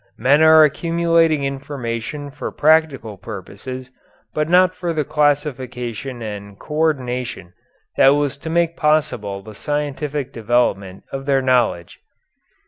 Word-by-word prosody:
Men 135 Hz, +6 st, +4 dB
are 160 Hz, 0 st, +8 dB
accumulating 165 Hz, 0 st, +2 dB
information 135 Hz, 0 st, -4 dB
for 145 Hz, -, -6 dB
practical 145 Hz, -9 st, +2 dB
purposes 125 Hz, +6 st, -8 dB, 0.4 s
but 155 Hz, +1 st, -1 dB
not 185 Hz, +1 st, +5 dB
for 175 Hz, -2 st, -3 dB
the 155 Hz, -2 st, 0 dB
classification 130 Hz, -5 st, -1 dB
and 100 Hz, -2 st, -7 dB
co 150 Hz, -, -10 dB
ordination 125 Hz, -, -1 dB, 0.4 s
that 135 Hz, +1 st, +6 dB
was 145 Hz, -2 st, 0 dB
to 160 Hz, -, -6 dB
make 170 Hz, 0 st, +1 dB
possible 145 Hz, -11 st, 0 dB
the 110 Hz, -, -11 dB
scientific 145 Hz, +1 st, -3 dB
development 105 Hz, -5 st, 0 dB
of 135 Hz, 0 st, -6 dB
their 135 Hz, -1 st, +2 dB
knowledge. 120 Hz, -9 st, +1 dB
135 Hz, 125 wpm, -20 LUFS, 120-155 Hz, 0.4 s, are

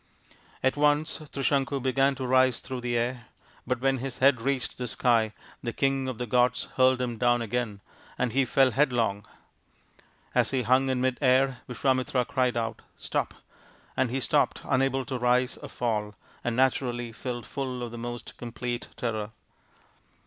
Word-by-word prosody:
At 130 Hz, -, +3 dB
once 150 Hz, +2 st, +2 dB
Trisanku 140 Hz, 0 st, 0 dB
began 135 Hz, +1 st, +2 dB
ta 130 Hz, -1 st, -4 dB
rise 130 Hz, -1 st, +4 dB
through 130 Hz, -2 st, -5 dB
the 120 Hz, 0 st, 0 dB
air, 120 Hz, 0 st, -2 dB, 0.4 s
but 125 Hz, -1 st, -1 dB
when 135 Hz, 0 st, +2 dB
his 130 Hz, 0 st, -5 dB
head 130 Hz, -3 st, +4 dB
reached 135 Hz, 0 st, -1 dB
the 125 Hz, -, -2 dB
sky 115 Hz, -2 st, +2 dB, 0.3 s
the 120 Hz, -2 st, -3 dB
king 135 Hz, -1 st, +1 dB
of 130 Hz, -3 st, -3 dB
the 125 Hz, -, -3 dB
gods 125 Hz, +1 st, +2 dB
hurled 130 Hz, 0 st, +4 dB
him 120 Hz, -3 st, -3 dB
down 120 Hz, 0 st, +3 dB
again, 110 Hz, -3 st, -2 dB, 0.4 s
and 125 Hz, -2 st, 0 dB
he 135 Hz, +1 st, +4 dB
fell 130 Hz, +1 st, +3 dB
headlong. 120 Hz, -7 st, +1 dB, 1.1 s
As -, -, +3 dB
he 130 Hz, -2 st, 0 dB
hung 130 Hz, +3 st, +3 dB
in 130 Hz, -1 st, 0 dB
mid 130 Hz, -1 st, 0 dB
air, 130 Hz, -1 st, +3 dB
Visvamitra 130 Hz, 0 st, +1 dB
cried 125 Hz, -2 st, +1 dB
out, 115 Hz, -1 st, -2 dB
" -, -, -40 dB
Stop! -, -, -1 dB, 0.3 s
" -, -, -29 dB
and 130 Hz, -1 st, +1 dB
he 130 Hz, +3 st, -1 dB
stopped, -, -, +1 dB
unable 135 Hz, 0 st, +1 dB
to 130 Hz, -2 st, -3 dB
rise 125 Hz, +1 st, +2 dB
or -, -, -9 dB
fall, 105 Hz, -3 st, -2 dB, 0.3 s
and 120 Hz, -1 st, -1 dB
naturally 120 Hz, -2 st, +1 dB
filled 120 Hz, +1 st, -5 dB
full 130 Hz, -2 st, -4 dB
of 120 Hz, -, -5 dB
the 120 Hz, -, -7 dB
most 120 Hz, 0 st, -6 dB
complete 120 Hz, 0 st, -4 dB
terror. 110 Hz, -3 st, -2 dB
125 Hz, 170 wpm, -27 LUFS, 120-130 Hz, 1.1 s, rise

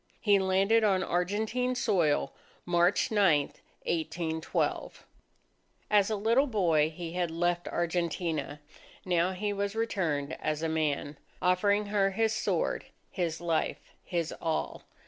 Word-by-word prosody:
He 205 Hz, -2 st, +4 dB
landed 195 Hz, +4 st, +3 dB
on 190 Hz, -3 st, +3 dB
Argentine 215 Hz, +9 st, -1 dB
soil, 170 Hz, -, +1 dB, 0.3 s
March 175 Hz, +4 st, +2 dB
9, 190 Hz, -9 st, +4 dB, 0.4 s
1812. 160 Hz, 0 st, -2 dB, 0.9 s
As 205 Hz, -1 st, +4 dB
a 215 Hz, -, 0 dB
little 230 Hz, +7 st, +2 dB
boy, 170 Hz, -, +2 dB
he 165 Hz, +1 st, -7 dB
had 175 Hz, -1 st, -1 dB
left 175 Hz, +1 st, -1 dB
Argentina. 165 Hz, -3 st, -2 dB, 0.5 s
Now 180 Hz, 0 st, +1 dB
he 205 Hz, +2 st, -2 dB
was 200 Hz, +1 st, -2 dB
returned 165 Hz, -10 st, -1 dB
as 155 Hz, +1 st, -2 dB
a -, -, +1 dB
man, 150 Hz, -2 st, -1 dB, 0.2 s
offering 200 Hz, +3 st, +2 dB
her 205 Hz, -1 st, +2 dB
his 220 Hz, +2 st, +1 dB
sword, -, -, -1 dB, 0.3 s
his 170 Hz, -4 st, -2 dB
life, 165 Hz, -2 st, -2 dB
his 170 Hz, -2 st, -2 dB
all. 160 Hz, -1 st, -2 dB
180 Hz, 125 wpm, -29 LUFS, 165-205 Hz, 0.9 s, He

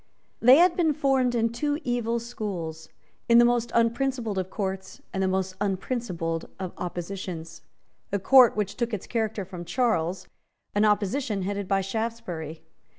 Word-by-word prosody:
They 250 Hz, +3 st, +8 dB
had 345 Hz, +1 st, +5 dB
been 325 Hz, -4 st, +2 dB
formed 265 Hz, -4 st, +2 dB
in 230 Hz, -1 st, +1 dB
two 290 Hz, +5 st, -1 dB
evil 235 Hz, -2 st, 0 dB
schools, 180 Hz, -9 st, -5 dB, 0.4 s
in 235 Hz, -, +7 dB
the 240 Hz, -, +8 dB
most 240 Hz, -1 st, +1 dB
unprincipled 235 Hz, -2 st, +1 dB
of 185 Hz, 0 st, -3 dB
courts, 190 Hz, -2 st, -4 dB
and 190 Hz, -, -1 dB
the 190 Hz, -, +2 dB
most 190 Hz, 0 st, -1 dB
unprincipled 185 Hz, -5 st, -2 dB
of 185 Hz, -2 st, -5 dB
oppositions, 175 Hz, -2 st, -5 dB, 0.5 s
a 200 Hz, -, +1 dB
court 250 Hz, +4 st, +6 dB
which 205 Hz, -2 st, -1 dB
took 235 Hz, -2 st, -2 dB
its 195 Hz, -, -8 dB
character 220 Hz, -4 st, -2 dB
from 180 Hz, -2 st, -8 dB
Charles, 185 Hz, -5 st, 0 dB, 0.5 s
an 205 Hz, +1 st, +3 dB
opposition 210 Hz, +1 st, +1 dB
headed 200 Hz, 0 st, -3 dB
by 195 Hz, 0 st, +2 dB
Shaftesbury. 195 Hz, -7 st, -4 dB
210 Hz, 150 wpm, -26 LUFS, 185-240 Hz, 0.5 s, They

